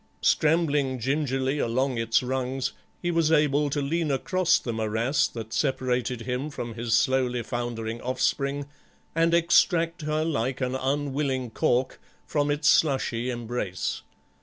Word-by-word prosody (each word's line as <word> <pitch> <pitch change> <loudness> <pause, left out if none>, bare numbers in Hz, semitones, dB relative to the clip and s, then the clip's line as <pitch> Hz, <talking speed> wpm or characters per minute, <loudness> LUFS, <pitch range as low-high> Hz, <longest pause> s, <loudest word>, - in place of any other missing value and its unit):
Scrambling 150 -4 +2
gingerly 135 +2 0
along 125 +1 0
its 115 +2 +2
rungs 130 +1 -2 0.3
he 175 - +1
was 165 -2 +2
able 150 -2 +3
to 145 0 -1
lean 160 +2 -1
across 170 +6 +2
the 120 - -4
morass 110 +5 +1
that 110 -1 -8
separated 125 -3 0
him 125 +4 -3
from 120 -5 -6
his 115 0 0
slowly 125 0 +1
foundering 115 -1 -4
offspring 140 +2 -1 0.5
and 165 +1 +2
extract 170 0 +3
her 155 +1 -1
like 130 -4 -1
an 130 -1 -1
unwilling 135 -2 -1
cork 125 +3 0 0.2
from 145 -1 0
it's 145 +1 0
slushy 130 -5 +2
embrace. 120 -6 -3
130 Hz, 135 wpm, -26 LUFS, 120-150 Hz, 0.5 s, able